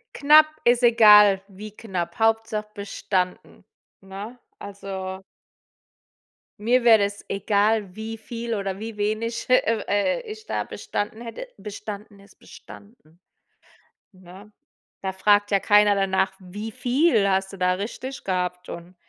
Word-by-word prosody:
Knapp 305 +2 +6 0.2
ist 240 +1 +3
egal, 210 -4 +7
wie 210 +2 -10
knapp, 180 -7 -5
Hauptsache 225 -1 0
bestanden. 200 -2 -4 0.4
Ne, 200 +6 -9 0.2
also 190 -1 -7 1.4
mir 240 +4 +2
wäre 230 -2 +7
das 200 0 -7
egal, 205 0 0
wie 220 +1 -6
viel 230 +1 -5
oder 195 -1 -4
wie 225 0 -7
wenig 215 +3 -2
he 255 - +3
eh, 225 -3 +2
äh, 205 - 0
ich 435 0 -11
da - - -2
bestanden 215 +2 -5
hätte, 240 - -8
bestanden 210 0 -9
ist 200 +1 -20
bestanden, 175 -6 -16 0.9
ne? 190 +2 -15 0.5
Da 190 - -2
fragt 205 +2 +3
ja 200 -1 +2
keiner 205 0 +4
danach: 190 -1 0
„Wie 205 +4 -8
viel 245 -2 +2
hast 190 0 0
du - - -9
da 180 0 +2
richtig 240 +7 -6
gehabt“ 180 -1 -3
und 175 +2 -9
205 Hz, 130 wpm, -23 LUFS, 195-225 Hz, 1.4 s, egal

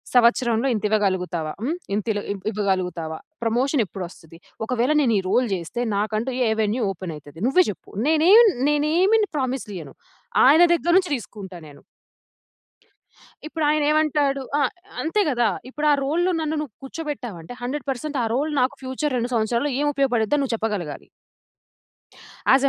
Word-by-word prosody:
సంవత్సరంలో 240 0 +4
ఇంత 215 - -3
ఇవ్వగలుగుతావా? 180 -6 0
హ్మ్, 310 +9 -1 0.2
ఇంతిలో 210 0 -1
ఇవ్ 195 - -5
ఇవ్వగలుగుతావా? 180 -6 -2 0.3
ప్రమోషన్ 250 +4 +1
ఎప్పుడొస్తది? 170 -3 -9 0.3
ఒకవేళ, 250 +3 +1
నేను 240 -5 +2
ఈ - - -1
రోల్ 250 +3 +2
జేస్తే, 190 +7 -3
నాకంటూ 215 +5 -1 0.2
ఏ - - +2
వెన్యూ 220 +3 0
ఓపెనైతది? 160 -4 -8
నువ్వే 365 +8 +5
చెప్పు. - - -14 0.2
నేనేం 345 +9 +7 0.3
నేనేమిని 355 +9 +3
ప్రామిస్‌లు 255 -5 -2
ఇయ్యను, 145 -5 -10 0.5
ఆయన 305 +6 +7
దగ్గర 345 0 +1
నుంచి 360 -5 -2
తీసుకుంటా 195 -6 -8
నేను. 145 - -15 1.6
ఇప్పుడాయన 305 -1 +1
ఏమంటాడు 295 -3 +1 0.2
ఆహ్, 275 - +2 0.3
అంతే 370 +7 +1
కదా! 240 -3 +2 0.2
ఇప్పుడు 300 +3 -2
ఆ - - +6
రోల్‌లో 345 +6 +1
నన్ను 315 0 -1
నువ్వు 270 -9 -7
కూర్చోబెట్టావంటే, 255 - -6
100% 265 +3 -4
పర్సెంట్ 280 +2 -3
ఆ - - +1
రోల్ 300 +4 0
నాకు 260 +2 +1
ఫ్యూచర్ 260 +1 -2
2 240 +1 -2
సంవత్సరాల్లో 235 +5 0
ఏం - - +1
ఉపయోగపడిద్దో 265 -2 +1
నువ్వు 265 -4 -1
చెప్పగలగాలి. 210 -9 -4 1.5
ఆస్ 270 +1 +4
250 Hz, 140 wpm, -23 LUFS, 205-295 Hz, 1.6 s, నేనేం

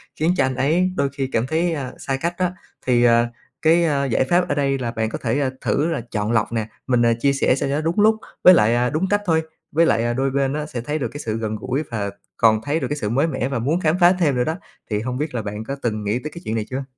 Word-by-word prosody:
khiến 165 +3 +1
cho - - +3
anh 130 0 -2
ấy 165 +8 +2
đôi 140 - +1
khi 135 -1 -1
cảm 115 +2 0
thấy, 165 +3 0
ơ, 135 -5 -4
xa 135 -1 -2
cách 170 +1 -1
đó. 180 -1 +2 0.4
Thì, 120 -2 +3
ờ, 120 0 +4 0.3
cái, 165 +1 +4
a, 140 -3 +1
giải 130 -1 +1
pháp 175 +7 +1
ở 145 - +1
đây 140 -1 +1
là 120 -2 -2
bạn 110 -1 -2
có - - -4
thể 140 -1 0
thử 145 - +1
là 155 - -2
chọn 105 0 -1
lọc 115 -1 +1
nè, 110 -2 -2 0.2
mình, 125 -2 +3
à, 115 - +4
chia 140 +2 +2
sẻ 135 -2 +2
sao 135 - -2
cho 140 - 0
nó 150 - 0
đúng 165 +5 -1
lúc 220 +1 +5 0.3
với 185 - +10
lại, 115 -8 +4
à, 120 +1 +2
đúng 160 +8 -1
cách 205 +1 +2
thôi, 160 -3 +2 0.3
với 165 +3 +4
lại, 115 - +2
à, 120 0 0
đôi 135 +2 0
bên 135 0 0
á 150 0 -2
sẽ 125 -6 -5
thấy 150 +6 -3
được 125 - -1
cái 145 - -8
sự 110 -6 -3
gần 110 -1 -3
gũi 135 +7 -2
và 105 -3 -2 0.3
còn 110 -1 +4
thấy 145 +6 0
được - - -2
cái 145 - -3
sự 105 -7 -2
mới 135 +8 +2
mẻ 130 -5 -2
và 135 - -2
muốn 145 +9 0
khám 165 -1 +1
phá 175 0 +6
thêm 150 -6 +2
nữa 125 - +2
đó. 160 +5 -1 0.3
Thì 105 -2 0
hông 125 +2 -3
biết 150 -1 -3
là 120 - -1
bạn 105 +1 -5
có 135 +5 -4
từng 110 -3 -2
nghĩ 105 +4 0
tới 150 +4 -6
cái 170 - -9
chuyện 110 - -2
này 110 -2 -1
chưa? 130 +1 -3
135 Hz, 300 wpm, -21 LUFS, 115-155 Hz, 0.4 s, với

